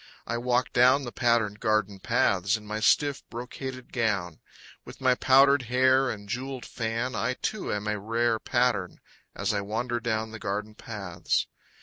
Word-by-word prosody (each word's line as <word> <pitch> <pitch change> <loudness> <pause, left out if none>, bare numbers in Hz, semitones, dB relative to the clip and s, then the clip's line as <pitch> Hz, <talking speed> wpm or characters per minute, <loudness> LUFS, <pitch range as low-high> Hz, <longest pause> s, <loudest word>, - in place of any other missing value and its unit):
I 120 - -2
walk 125 +1 0
down 130 +3 +5
the 120 - -5
patterned 115 -4 +1
garden 110 -2 0
paths 100 +3 +2
In 105 - -13
my 105 +1 -3
stiff, 140 +5 +2
brocaded 130 +1 -7
gown. 100 -9 -1 0.4
With - - -12
my 130 -1 +4
powdered 135 +2 +5
hair 130 +1 +4
and 100 -3 -6
jewelled 130 +3 -4
fan, 115 +2 -3
I 120 +3 -1
too 215 +8 -3
am 105 0 -3
a 105 0 -1
rare 115 +2 0
Pattern. 120 -8 0 0.4
As - - -1
I 100 - 0
wander 120 +4 -2
down 110 -1 -2
The 115 - -8
garden 105 +1 -3
paths. 100 -6 -2
115 Hz, 160 wpm, -27 LUFS, 105-125 Hz, 0.4 s, down